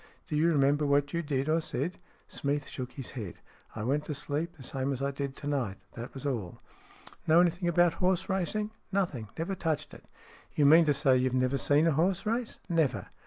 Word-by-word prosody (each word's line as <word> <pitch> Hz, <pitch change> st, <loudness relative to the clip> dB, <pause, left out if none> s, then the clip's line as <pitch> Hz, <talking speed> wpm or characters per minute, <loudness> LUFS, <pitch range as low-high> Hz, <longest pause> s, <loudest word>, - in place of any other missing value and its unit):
Do 150 Hz, -, -3 dB
you 160 Hz, +3 st, +3 dB
remember 145 Hz, -1 st, +3 dB
what 145 Hz, 0 st, +2 dB
you 170 Hz, -, 0 dB
did, 140 Hz, -3 st, -1 dB
or 160 Hz, +1 st, +2 dB
said? 155 Hz, +3 st, -3 dB, 0.2 s
" -, -, -34 dB
Smeath 145 Hz, 0 st, -1 dB
shook 125 Hz, -1 st, -6 dB
his 135 Hz, -, -7 dB
head. 105 Hz, -9 st, -6 dB, 0.2 s
" -, -, -27 dB
I 110 Hz, -, -4 dB
went 140 Hz, +6 st, 0 dB
to 150 Hz, -, -3 dB
sleep, 150 Hz, +4 st, -3 dB
the 135 Hz, -, -11 dB
same 135 Hz, +1 st, -2 dB
as 135 Hz, -, -3 dB
I 140 Hz, 0 st, -1 dB
did 140 Hz, 0 st, -4 dB
to -, -, -9 dB
night. 125 Hz, -9 st, -1 dB, 0.2 s
That 120 Hz, +2 st, -7 dB
was 135 Hz, -, -7 dB
all." 115 Hz, -11 st, -3 dB, 0.3 s
" -, -, -21 dB
Know 160 Hz, +1 st, +6 dB
anything 175 Hz, 0 st, +2 dB
about 175 Hz, 0 st, +4 dB
horse 185 Hz, -1 st, +2 dB
racing? 205 Hz, +3 st, 0 dB
" -, -, -42 dB
" -, -, -39 dB
Nothing. 170 Hz, -, -1 dB
Never 165 Hz, +4 st, -2 dB
touched 160 Hz, -4 st, -2 dB
it." -, -, -13 dB, 0.3 s
" -, -, -25 dB
You 145 Hz, -, +3 dB
mean 160 Hz, +3 st, +7 dB
to 150 Hz, -, +3 dB
say 135 Hz, -2 st, +4 dB
you've 130 Hz, 0 st, +1 dB
never 130 Hz, +1 st, +1 dB
seen 145 Hz, +3 st, +3 dB
a 165 Hz, -, +4 dB
horse 170 Hz, +7 st, +1 dB
race?" 230 Hz, +2 st, -2 dB
" -, -, -29 dB
Never." 165 Hz, -7 st, 0 dB
145 Hz, 240 wpm, -30 LUFS, 135-170 Hz, 0.3 s, mean